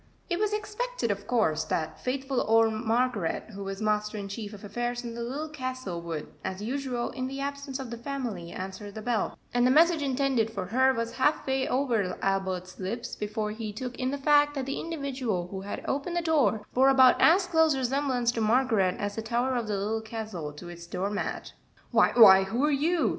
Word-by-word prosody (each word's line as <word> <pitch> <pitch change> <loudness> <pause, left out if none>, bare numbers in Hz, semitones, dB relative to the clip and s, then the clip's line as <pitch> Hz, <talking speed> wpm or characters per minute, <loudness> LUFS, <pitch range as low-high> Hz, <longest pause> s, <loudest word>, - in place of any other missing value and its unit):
It 345 - +1
was 425 0 +1
expected, 425 - -2
of 200 0 -5
course, 160 -11 +2
that 155 0 -2
faithful 265 +1 -1
old 225 0 +4
Margaret, 225 -4 -1
who 200 -1 -7
was 195 +2 -5
master 210 0 0
in 200 -1 -5
chief 205 0 -6
of 210 -1 -11
affairs 240 +4 -3
in 235 -1 -5
the 235 - -6
Little 275 +7 -3
Castle, 255 - -5
would, 165 -3 -5 0.2
as 190 - -4
usual, 245 +2 -2
in 255 -1 -3
the 270 +1 -6
absence 280 -1 -4
of 265 -3 -7
the 235 - -6
family, 235 -10 -4
answer 190 +2 -6
the 215 +2 -8
bell, 235 -3 -1 0.2
and 245 - +2
the 250 - +5
message 325 +3 +5
intended 265 -4 +1
for 200 -4 -4
her 260 +7 +3
was 230 -2 -2
half 285 +4 +2
way 265 0 0
over 235 -9 0
Albert's 190 -2 -2
lips 215 +6 -4
before 210 0 -3
he 215 0 -5
took 245 +4 -6
in 255 0 -1
the 285 - -2
fact 290 +1 +4
that 270 -2 -2
the 275 - -3
individual 265 - -3
who 190 0 -5
had 200 +1 -6
opened 285 +6 -2
the 345 - +1
door 285 -10 +2
bore 265 +2 +5
about 260 -2 +6
as 365 +3 +6
close 320 -5 +3
resemblance 260 -2 +1
to 230 - -3
Margaret 220 -5 +2
as 205 0 -3
the - - -1
tower 240 +3 0
of 235 -3 -1
the 205 -1 -1
Little 215 +3 -1
Castle 220 -8 -5
to 160 +4 -10
its 170 0 -10
door 195 +3 -2
mat. 205 - -4 0.4
"Why - - +4
why, 195 -5 +9
who 235 +9 0
are 300 - +2
you?" 320 +5 +2
235 Hz, 210 wpm, -28 LUFS, 205-270 Hz, 0.4 s, why